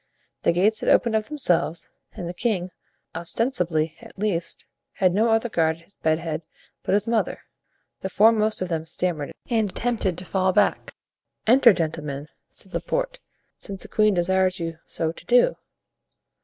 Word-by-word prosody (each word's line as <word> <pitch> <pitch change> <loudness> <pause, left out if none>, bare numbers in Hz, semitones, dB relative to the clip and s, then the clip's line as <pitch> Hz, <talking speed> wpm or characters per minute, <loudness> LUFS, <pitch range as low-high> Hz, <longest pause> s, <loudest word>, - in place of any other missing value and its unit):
The - - +3
gates 200 +6 +2
had - - -1
opened 230 -2 +4
of 215 -1 0
themselves, 175 - 0 0.2
and 175 - -6
the 175 - -4
king, 185 -3 -1 0.4
ostensibly 170 - 0
at - - -14
least, 185 -5 -2 0.3
had 185 -2 +2
no 220 +4 +3
other 225 +1 +2
guard 160 -7 +1
at 165 - -20
his 200 - -14
bed 160 0 +1
head 165 -1 -4 0.4
but - - +1
his 210 - 0
mother. 230 -1 0 0.6
The 190 - -4
foremost 215 0 +3
of - - -3
them 160 -2 -1
stammered 160 -3 -1 0.2
and 220 -4 +1
attempted 215 -5 0
to 180 - -8
fall 185 0 +1
back. 205 +1 +1 0.5
"Enter, 245 +1 +7
gentlemen," 155 -5 -3 0.2
said - - -17
Laporte, - - -2 0.4
"since 195 -1 -7
the - - -10
queen 215 -2 +3
desires 185 +1 +2
you 165 -1 -4
so 160 -1 -2
to - - -13
do." - - +4
185 Hz, 165 wpm, -24 LUFS, 165-220 Hz, 0.6 s, Enter